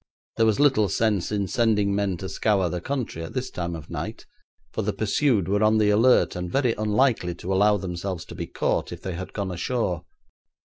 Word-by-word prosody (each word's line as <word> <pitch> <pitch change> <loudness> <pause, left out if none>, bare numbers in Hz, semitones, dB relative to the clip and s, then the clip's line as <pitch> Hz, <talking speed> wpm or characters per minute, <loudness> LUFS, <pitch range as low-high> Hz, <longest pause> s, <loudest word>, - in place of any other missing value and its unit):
There 115 - +4
was 110 - +2
little 135 -8 +4
sense 105 -5 0
in 100 -2 0
sending 105 -2 +2
men 100 -2 0
to 95 - -6
scour 95 -1 +1
the 90 +1 -3
country 125 -9 -3
at 80 - -7
this 130 -1 -3
time 85 -1 -3
of 80 -1 -10
night, - - -5 0.5
for - - -1
the - - -1
pursued 110 - +1
were 100 +2 +1
on 110 +1 +4
the 105 -1 +3
alert, 115 +3 +4
and 90 0 -4
very 130 -4 +2
unlikely 110 -4 +1
to 90 +2 -3
allow 105 +2 +4
themselves 90 -1 -4
to - - -10
be - - -5
caught - - -1
if - - -8
they 95 - -3
had 95 +2 -6
gone 100 -3 -3
ashore. 90 -1 -2
100 Hz, 205 wpm, -25 LUFS, 90-110 Hz, 0.5 s, There